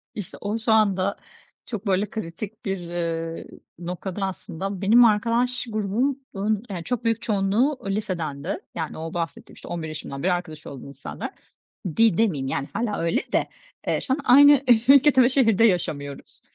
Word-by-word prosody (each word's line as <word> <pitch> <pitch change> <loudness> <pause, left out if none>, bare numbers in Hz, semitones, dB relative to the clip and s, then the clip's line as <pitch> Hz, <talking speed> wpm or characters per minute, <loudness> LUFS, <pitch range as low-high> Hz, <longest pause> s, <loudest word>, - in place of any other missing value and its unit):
İşte, 205 -5 -7
o 205 +2 -2
şu 225 0 -1
anda 200 -3 +3 0.5
çok, 220 -3 -6
böyle, 195 +1 +2
kritik 215 +1 -7
bir, 195 -1 -1
eee, 165 -1 -4 0.3
noktada 180 +3 -4
aslında 190 0 -5
benim 230 +5 +6
arkadaş 235 +3 +1
grubumun, 230 +6 -1 0.4
yani, 180 -4 -5
çok 245 +3 -3
büyük 230 -1 0
çoğunluğu 215 +7 +1
lisedendi. 175 -6 -3 0.2
Yani, 160 -2 -4
o 160 +1 -6
bahsettiğim, 165 -3 -5
işte, - - -12
11 165 -2 -4
yaşımdan 150 -2 -6
beri 180 0 +3
arkadaş 160 -3 -5
olduğum 140 -1 -9
insanlar 140 - -7 0.7
di 225 -6 +4
demeyeyim, 160 -12 +1
yani, 135 - -2
hâlâ 230 -3 -1
öyle 165 0 +1
de, - - +1 0.4
eee, - - +1
şu 260 - 0
an 285 - -1
aynı 285 +2 +7 0.3
ülkede 275 -1 +7
ve 240 - +5
şehirde 230 -5 +4
yaşamıyoruz. 145 -8 -2
195 Hz, 155 wpm, -24 LUFS, 170-230 Hz, 0.7 s, aynı